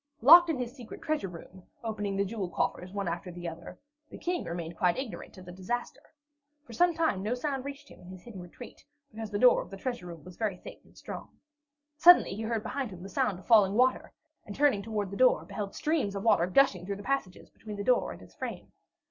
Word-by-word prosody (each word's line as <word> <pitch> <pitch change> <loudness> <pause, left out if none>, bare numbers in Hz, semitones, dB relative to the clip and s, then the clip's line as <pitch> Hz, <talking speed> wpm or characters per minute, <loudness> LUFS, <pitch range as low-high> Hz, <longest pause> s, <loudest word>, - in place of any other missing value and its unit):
Locked 340 +6 +9
in 315 - 0
his 250 0 -5
secret 245 -5 -10
treasure 310 -10 -1
room, 180 +1 -12 0.2
opening 210 -3 -3
the 200 - +1
jewel 200 -3 -4
coffers 180 +1 -2
one 200 -1 -3
after 175 +2 -4
the 175 0 -7
other, 165 0 -8 0.3
the - - -10
King 355 0 -2
remained 170 0 -5
quite 175 0 +2
ignorant 260 -6 -7
of 185 - -11
the 180 - -9
disaster. 240 +9 -4 0.6
For - - -12
some 350 -1 +3
time 320 - +1
no 215 +5 -1
sound 270 0 -3
reached 280 +1 -8
him - - -15
in 180 - -14
his 185 -1 -11
hidden 215 -6 -9
retreat, 180 +8 -12 0.3
because 220 0 -6
the 205 - -2
door 250 +3 +6
of - - -10
the 195 - -8
treasure 240 -5 -4
room 170 -3 -10
was 180 -1 -12
very 210 -5 -1
thick - - -11
and - - -23
strong. - - -8 0.7
Suddenly 350 - +7
he 210 - -5
heard 225 -1 -2
behind 260 +1 -3
him 180 -2 -10
the 195 - -8
sound 190 0 0
of 185 - -14
falling 210 -5 +5
water, 255 +2 +2 0.3
and 200 - -9
turning 275 -8 +3
toward 205 -2 -3
the 200 - -5
door, 255 0 +4
beheld 205 -2 -6
streams 295 -11 0
of 200 - -4
water 205 -6 +4
gushing 185 -3 +3
through 200 - -2
the 200 - -9
passages 265 -8 -3
between 215 -1 -9
the 200 - -3
door 250 +3 +2
and - - -10
its - - -17
frame. - - -7
210 Hz, 230 wpm, -29 LUFS, 185-255 Hz, 0.7 s, Locked